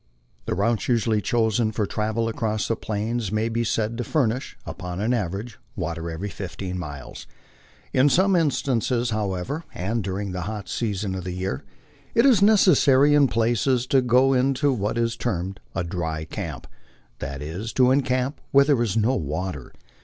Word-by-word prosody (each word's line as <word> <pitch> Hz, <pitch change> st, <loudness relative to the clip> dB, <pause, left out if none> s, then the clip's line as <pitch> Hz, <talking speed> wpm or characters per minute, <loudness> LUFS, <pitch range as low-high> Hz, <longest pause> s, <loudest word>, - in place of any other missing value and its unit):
The -, -, 0 dB
routes 110 Hz, +4 st, 0 dB
usually 115 Hz, -3 st, +2 dB
chosen 110 Hz, 0 st, +1 dB
for 105 Hz, -1 st, -1 dB
travel 110 Hz, +3 st, -1 dB
across 110 Hz, -1 st, -1 dB
the 115 Hz, -, +1 dB
Plains 110 Hz, 0 st, -3 dB
may 110 Hz, +1 st, 0 dB
be 115 Hz, +1 st, 0 dB
said 115 Hz, +1 st, -1 dB
to -, -, 0 dB
furnish, 130 Hz, -3 st, -1 dB
npon 90 Hz, 0 st, -6 dB
an 110 Hz, +4 st, +1 dB
average, 105 Hz, +1 st, -3 dB, 0.2 s
water 85 Hz, -2 st, -3 dB
every 85 Hz, +5 st, -4 dB
fifteen 95 Hz, -2 st, -5 dB
miles. 75 Hz, -6 st, -8 dB, 0.7 s
In 130 Hz, +3 st, +5 dB
some 190 Hz, +7 st, +4 dB
instances, 125 Hz, -6 st, +1 dB
however, 105 Hz, -, -2 dB
and 105 Hz, +5 st, -2 dB
during 95 Hz, +1 st, -3 dB
the 90 Hz, 0 st, -4 dB
hot 105 Hz, -2 st, -6 dB
season 105 Hz, -4 st, -2 dB
of 95 Hz, -1 st, -4 dB
the 90 Hz, 0 st, -4 dB
year, 90 Hz, -7 st, -3 dB, 0.5 s
it 230 Hz, -, +5 dB
is 245 Hz, -8 st, +5 dB
necessary 150 Hz, -9 st, +5 dB
in 145 Hz, -2 st, +5 dB
places 120 Hz, +2 st, +1 dB
to 135 Hz, 0 st, +3 dB
go 125 Hz, +2 st, +4 dB
into 135 Hz, +2 st, +2 dB
what 105 Hz, -1 st, -2 dB
is 115 Hz, 0 st, 0 dB
termed 95 Hz, -5 st, -3 dB
" -, -, -35 dB
a 90 Hz, -, 0 dB
dry 80 Hz, -3 st, -3 dB
camp," -, -, -6 dB, 0.5 s
that 70 Hz, +1 st, -5 dB
is, 90 Hz, +9 st, -5 dB
to 130 Hz, -1 st, +4 dB
encamp 130 Hz, 0 st, 0 dB
where 140 Hz, 0 st, +5 dB
there 140 Hz, -5 st, +3 dB
is 115 Hz, -2 st, 0 dB
no 115 Hz, +4 st, +3 dB
water. 80 Hz, -, -4 dB
110 Hz, 170 wpm, -24 LUFS, 95-125 Hz, 0.7 s, In